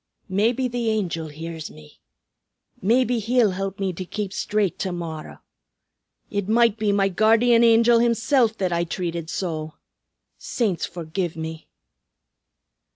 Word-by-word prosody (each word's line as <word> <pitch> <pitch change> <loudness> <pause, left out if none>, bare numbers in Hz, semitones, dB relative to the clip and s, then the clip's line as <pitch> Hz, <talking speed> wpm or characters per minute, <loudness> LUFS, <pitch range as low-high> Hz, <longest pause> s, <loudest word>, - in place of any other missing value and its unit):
"Maybe 230 +7 +1
the 240 -2 -2
Angel 175 -7 -1
hears 160 +1 -7
me. 75 -1 -16 0.8
Maybe 240 +3 +2
he'll 230 -1 +2
help 195 +1 -4
me 190 -2 -1
to 185 - -5
keep 200 +1 -5
straight 205 -4 -1
to 190 - -2
morrow. 165 -3 -7 0.9
It 205 -1 -2
might 230 -1 +4
be 210 -1 +1
my 200 -1 +3
Guardian 225 +4 +4
Angel 230 0 +5
himsilf 235 0 +2
that 185 -3 -1
I 170 0 +1
treated 170 -1 -4
so! 160 -4 -4 0.6
Saints 205 -8 -1
forgive 170 0 -4
me!" 160 0 -6
195 Hz, 130 wpm, -23 LUFS, 170-230 Hz, 0.9 s, Angel